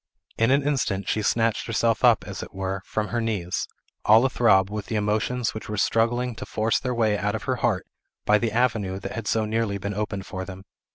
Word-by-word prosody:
In 115 +1 +4
an 140 +2 +3
instant 130 -9 -1
she 110 - 0
snatched 115 +1 +1
herself 115 -1 +1
up, - - +5
as - - -6
it - - -10
were, 95 0 -3
from 105 -2 -2
her 120 +4 -1
knees, 100 -6 -2 0.4
all 110 +4 +6
a 135 - +1
throb 95 -6 +4
with 105 -1 -4
the 110 - -3
emotions 110 +3 0
which 110 - -7
were 105 - -3
struggling 120 +4 +1
to - - -6
force 110 +1 +1
their 125 -2 -2
way 110 -3 +2
out 105 +1 -1
of 110 - -4
her - - -1
heart - - 0 0.4
by 105 0 +4
the 115 0 -1
avenue 110 -5 0
that - - -6
had 115 - -5
so 110 -1 +1
nearly 110 -2 -1
been 100 +1 -4
opened 105 -1 -3
for 95 0 -5
them. 95 0 -9
110 Hz, 225 wpm, -25 LUFS, 100-115 Hz, 0.4 s, all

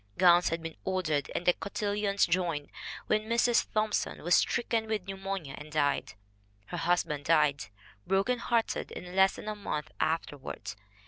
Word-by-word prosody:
Gowns 175 -1 +6
had 165 0 -3
been 165 -1 -6
ordered 165 -7 0
and 175 - -2
"the 180 - +6
cotillions 205 0 0
joined" 170 -4 -1 0.3
when 215 +1 0
Mrs. 235 0 +4
Thomp 215 0 0
son - - -1
was 175 +2 +2
stricken 225 -2 +2
with 215 -4 -2
pneumonia 195 -6 -4
and 150 +1 -10
died. 145 -9 0 0.5
Her 175 - -6
hus 175 +1 +2
band 145 -1 -5
died, 150 -3 +3 0.4
broken 195 +6 +2
hearted, 230 -1 0
in 180 +1 -8
less 190 0 +5
than - - -9
a 215 - -1
month 150 -7 -4
after 155 -2 -1
ward. 105 -6 -6
180 Hz, 170 wpm, -30 LUFS, 155-205 Hz, 0.5 s, Gowns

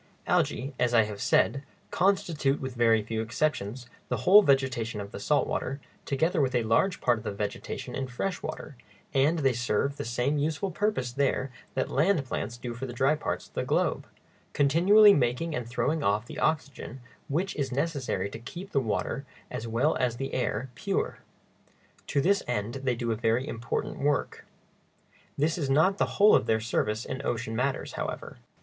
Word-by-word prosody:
Algæ, 135 +2 +1
as 120 -1 +2
I 115 - +6
have 105 -1 -6
said, 140 - +2 0.3
constitute, 165 -7 +1
with 130 -1 -5
very 115 -2 +3
few 110 +1 -3
exceptions, 120 -1 -2 0.2
the - - 0
whole 200 +3 +9
vegetation 130 - +1
of 100 0 -7
the - - -7
salt - - +2
water, 135 +2 -3 0.3
together 160 +4 +1
with 130 -2 +1
a 120 - +2
large 120 - +2
part 120 -3 +2
of - - -12
the 110 - -3
vegetation 100 0 -5
in 135 - -3
fresh 175 +10 -3
water; 155 -2 -6 0.4
and 140 +5 +3
they 135 -4 +2
serve 125 +3 0
the - - -3
same 125 +5 0
useful 160 +6 -1
purpose 175 - -1
there 135 0 0 0.2
that 130 - -1
land 160 0 +2
plants 120 -2 -4
do 120 -1 -5
for 120 +3 -5
the 120 - -7
dry 135 +4 +3
parts 155 - -3
of - - -29
the - - -1
globe, - - 0 0.5
continually 190 +9 +6
making 135 +4 0
and 125 -4 -3
throwing 150 +6 0
off 105 -1 +1
the - - -8
oxygen 140 -4 -2 0.3
which 175 +7 -1
is 135 -3 -2
necessary 135 - -1
to 105 +3 -8
keep 175 - -9
the 140 - +2
water 125 +4 -2 0.3
as 115 - -4
well 120 +7 +1
as 120 -2 0
the 135 +1 -4
air 125 0 -2
pure. - - -2 0.9
To 140 - +1
this 200 +7 +3
end 120 +2 -2
they 125 -2 +2
do 115 0 -2
a - - +1
very 115 +4 0
important 115 +1 -3
work. 145 0 -1 0.9
This 160 +4 +1
is 140 -4 -1
not 160 +8 +3
the - - +4
whole 210 +1 +7
of - - +4
their 110 - +3
service 110 0 -1
in 130 +1 -5
ocean 115 -3 -2
matters, 130 +3 -1
however. - - -5
130 Hz, 185 wpm, -28 LUFS, 120-150 Hz, 0.9 s, whole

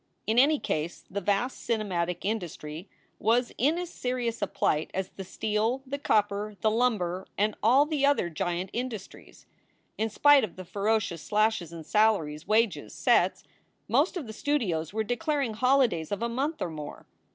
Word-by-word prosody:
In 225 +2 +3
any 295 +4 +5
case, 160 - -3
the 200 +2 -2
vast 205 +7 0
cinematic 180 -6 -1
industry 175 -4 -4 0.3
was 235 +3 +2
in 295 +7 +3
as 355 -1 -4
serious 245 -3 -2
a 205 - +1
plight 155 -3 0
as 190 0 -2
the 195 - -8
steel, 220 +7 -1
the 280 +2 -4
copper, 210 -4 +1
the 215 - +3
lumber, 205 -6 0
and 210 +1 +2
all 260 +6 +5
the 300 -2 -1
other 280 -10 +3
giant 175 +3 -3
industries. 235 -5 -6 0.5
In 220 +1 +1
spite 290 +5 +6
of 210 - -4
the 185 - -8
ferocious 200 -3 0
slashes 215 -5 +1
in 165 -1 -8
salaries, 170 -6 +1
wages, 220 -1 +1
sets, - - +2 0.4
most 295 +10 +2
of 320 - -4
the 220 - -8
studios 205 - -1
were 220 +2 -1
declaring 275 +1 -1
holidays 235 - +2
of 205 +2 -2
a - - +1
month 285 +6 -2
or 170 - -3
more. 150 -2 -8
215 Hz, 165 wpm, -28 LUFS, 185-250 Hz, 0.5 s, spite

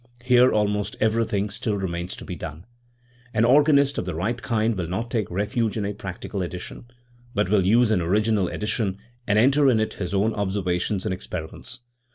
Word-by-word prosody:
Here 125 0 +5
almost 105 -1 0
everything 110 -2 +1
still 105 -3 -2
remains 90 -2 -3
to - - -10
be - - -5
done. 75 +5 -8 0.7
An 110 +1 +4
organist 140 +1 +4
of - - -3
the 90 - -3
right 115 +9 -2
kind 115 -1 0
will 90 -3 -3
not 110 +7 -3
take 110 -6 -1
refuge 105 +4 -1
in 105 - -1
a 100 - -2
practical 95 0 -6
edition, 90 +5 -6 0.5
but 105 -3 +1
will 100 -2 +3
use 115 +4 +4
an 105 - +2
original 105 +2 +2
edition, 105 -1 -2 0.3
and 105 - +3
enter 135 +5 +5
in 115 -4 +3
it 110 - -1
his 90 -2 -2
own 105 +3 +2
observations 95 -1 -1
and - - 0
experiments. 90 +7 -6
105 Hz, 185 wpm, -24 LUFS, 95-115 Hz, 0.7 s, Here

